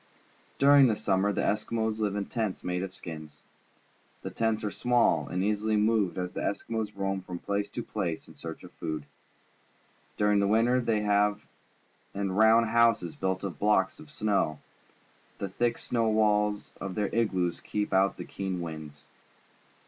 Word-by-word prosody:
During 140 Hz, -1 st, +7 dB
the 110 Hz, -, +2 dB
summer 100 Hz, -1 st, +1 dB
the -, -, -1 dB
Eskimos 110 Hz, +1 st, -1 dB
Hve 105 Hz, -2 st, 0 dB
in 100 Hz, -, -2 dB
tents 110 Hz, -6 st, -3 dB
made 90 Hz, 0 st, -2 dB
of 95 Hz, 0 st, -5 dB
skins. 80 Hz, -3 st, -9 dB, 0.8 s
The -, -, -5 dB
tents 110 Hz, -1 st, 0 dB
are 105 Hz, -, -1 dB
small 120 Hz, -11 st, +2 dB
and 90 Hz, +1 st, -2 dB
are -, -, +1 dB
easily 105 Hz, +1 st, +1 dB
moved 105 Hz, -3 st, +2 dB
as 90 Hz, -1 st, -3 dB
the -, -, -4 dB
Eskimos 110 Hz, +1 st, -2 dB
roam 95 Hz, -1 st, -2 dB
from 90 Hz, -1 st, -7 dB
place 100 Hz, +3 st, -2 dB
to -, -, -5 dB
place 90 Hz, -7 st, -3 dB
in -, -, -14 dB
search -, -, -8 dB
of -, -, -11 dB
food. 75 Hz, -2 st, -5 dB, 1.1 s
During 105 Hz, 0 st, +3 dB
the 100 Hz, -, +2 dB
winter 115 Hz, +4 st, +3 dB
they 115 Hz, -3 st, +1 dB
hve 105 Hz, 0 st, +2 dB, 0.7 s
in 100 Hz, -1 st, -1 dB
round 110 Hz, +3 st, +5 dB
houses 115 Hz, -7 st, +3 dB
built 95 Hz, 0 st, -2 dB
of 95 Hz, -3 st, -5 dB
blocks 105 Hz, -2 st, +2 dB
of 75 Hz, -, -13 dB
snow. 100 Hz, -8 st, 0 dB, 0.8 s
The 100 Hz, -, -4 dB
thick 120 Hz, +4 st, 0 dB
snow 115 Hz, -2 st, 0 dB
walls 105 Hz, -1 st, +1 dB
of 95 Hz, -1 st, -4 dB
their 105 Hz, -2 st, -1 dB
igloos 95 Hz, -7 st, 0 dB
keep 105 Hz, 0 st, -3 dB
out 95 Hz, +1 st, +3 dB
the -, -, -6 dB
keen 95 Hz, -2 st, -4 dB
winds. 80 Hz, -3 st, -7 dB
105 Hz, 170 wpm, -29 LUFS, 95-110 Hz, 1.1 s, During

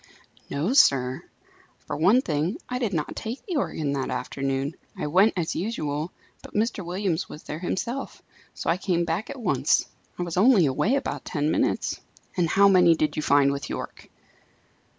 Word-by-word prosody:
"No, 155 Hz, -, -1 dB
sir. 130 Hz, -, +4 dB, 0.6 s
For -, -, -4 dB
one 195 Hz, -, +4 dB
thing, 155 Hz, +5 st, -1 dB
I 250 Hz, 0 st, -3 dB
did 230 Hz, -5 st, -1 dB
not 155 Hz, -5 st, -2 dB
take 230 Hz, +4 st, -6 dB
the 360 Hz, -6 st, -2 dB
organ 150 Hz, -, -1 dB
that 135 Hz, -1 st, -2 dB
afternoon. 135 Hz, +2 st, -2 dB, 0.2 s
I -, -, -3 dB
went, 185 Hz, +8 st, +4 dB
as 165 Hz, -2 st, -1 dB
usual, 160 Hz, -6 st, -2 dB, 0.3 s
but -, -, -13 dB
Mr. 210 Hz, -2 st, 0 dB
Williams 180 Hz, -1 st, -2 dB
was 150 Hz, -, -10 dB
there 150 Hz, -, -6 dB
himself, 235 Hz, +9 st, -3 dB, 0.4 s
so -, -, -1 dB
I 170 Hz, -, +1 dB
came 175 Hz, -2 st, 0 dB
back 170 Hz, +6 st, -2 dB
at 280 Hz, -1 st, -7 dB
once. 235 Hz, -, +2 dB, 0.3 s
I 180 Hz, -, -2 dB
was 170 Hz, 0 st, -4 dB
only 205 Hz, -3 st, +6 dB
away 150 Hz, -, +1 dB
about 280 Hz, -, -3 dB
ten 150 Hz, +1 st, -1 dB
minutes." -, -, 0 dB, 0.3 s
"And 175 Hz, -3 st, +1 dB
how 200 Hz, +3 st, +5 dB
many 180 Hz, -3 st, +6 dB
did 155 Hz, -1 st, 0 dB
you -, -, -1 dB
find 140 Hz, -1 st, +4 dB
with 140 Hz, 0 st, -4 dB
Yorke?" -, -, -7 dB
170 Hz, 175 wpm, -25 LUFS, 145-205 Hz, 0.6 s, only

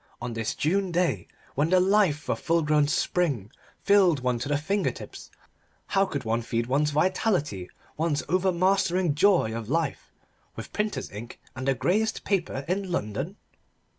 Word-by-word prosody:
On 120 Hz, 0 st, -4 dB
this 115 Hz, -1 st, -2 dB
June 190 Hz, +4 st, 0 dB
day, 170 Hz, -, 0 dB, 0.3 s
when 145 Hz, +4 st, +1 dB
the 185 Hz, +1 st, +5 dB
life 185 Hz, -6 st, +2 dB
of -, -, -1 dB
full 165 Hz, 0 st, +1 dB
grown 150 Hz, -1 st, +3 dB
spring 145 Hz, -, 0 dB, 0.3 s
thrilled 190 Hz, -8 st, +4 dB
one 125 Hz, -1 st, 0 dB
to 135 Hz, -, -4 dB
the 145 Hz, -, +2 dB
finger 195 Hz, +7 st, 0 dB
tips, -, -, -10 dB, 0.6 s
how 195 Hz, 0 st, +2 dB
could 145 Hz, -7 st, -4 dB
one 115 Hz, +1 st, 0 dB
feed 115 Hz, 0 st, -2 dB
one's 140 Hz, +4 st, +1 dB
vitality, 150 Hz, -, 0 dB, 0.3 s
one's 155 Hz, -2 st, 0 dB
over 185 Hz, +4 st, +2 dB
mastering 185 Hz, -2 st, +2 dB
joy 165 Hz, -, +3 dB
of 115 Hz, -1 st, -5 dB
life, 160 Hz, 0 st, -1 dB, 0.4 s
with -, -, -8 dB
printer's 210 Hz, 0 st, -2 dB
ink 110 Hz, +4 st, -9 dB, 0.2 s
and 130 Hz, +1 st, -5 dB
the 135 Hz, -, +3 dB
greyest 185 Hz, -, 0 dB
paper 170 Hz, -8 st, -1 dB
in 190 Hz, +1 st, -2 dB
London? 135 Hz, -, -3 dB
155 Hz, 165 wpm, -26 LUFS, 130-185 Hz, 0.6 s, the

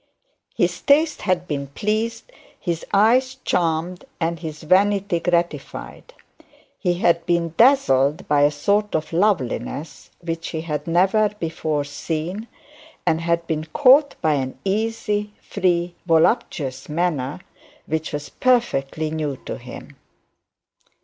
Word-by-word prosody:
His -, -, 0 dB
taste 305 Hz, +2 st, +3 dB
had 180 Hz, -2 st, 0 dB
been 140 Hz, -2 st, -3 dB
pleased, 220 Hz, -, -2 dB, 0.3 s
his 170 Hz, -3 st, -3 dB
eyes 250 Hz, +6 st, +3 dB
charmed, 170 Hz, +1 st, 0 dB, 0.2 s
and 165 Hz, 0 st, -1 dB
his 155 Hz, -1 st, -7 dB
vanity 195 Hz, +1 st, +2 dB
gratified. 175 Hz, -, -3 dB, 0.6 s
He 180 Hz, -3 st, +1 dB
had 170 Hz, -1 st, +2 dB
been 170 Hz, -2 st, +1 dB
dazzled 155 Hz, -, +4 dB
by 145 Hz, -1 st, +3 dB
a 145 Hz, -, +6 dB
sort 200 Hz, +8 st, 0 dB
of 160 Hz, +1 st, -2 dB
loveliness 160 Hz, -, -1 dB
which 165 Hz, -1 st, -4 dB
he 160 Hz, -, -4 dB
had 150 Hz, -1 st, -4 dB
never 190 Hz, +5 st, +3 dB
before 155 Hz, -3 st, -2 dB
seen, 165 Hz, +8 st, -4 dB, 0.6 s
and 160 Hz, +1 st, +2 dB
had 170 Hz, 0 st, 0 dB
been 155 Hz, -1 st, -2 dB
caught 275 Hz, -, +5 dB
by 155 Hz, -, +3 dB
an 130 Hz, -2 st, -2 dB
easy, 210 Hz, 0 st, -1 dB
free, 175 Hz, -3 st, 0 dB
voluptuous 145 Hz, -5 st, +1 dB
manner 150 Hz, -4 st, -1 dB, 0.5 s
which 160 Hz, +1 st, -2 dB
was 145 Hz, 0 st, -5 dB
perfectly 160 Hz, -, 0 dB
new 150 Hz, -4 st, -2 dB
to -, -, -5 dB
him. -, -, -11 dB
170 Hz, 125 wpm, -22 LUFS, 155-205 Hz, 0.6 s, a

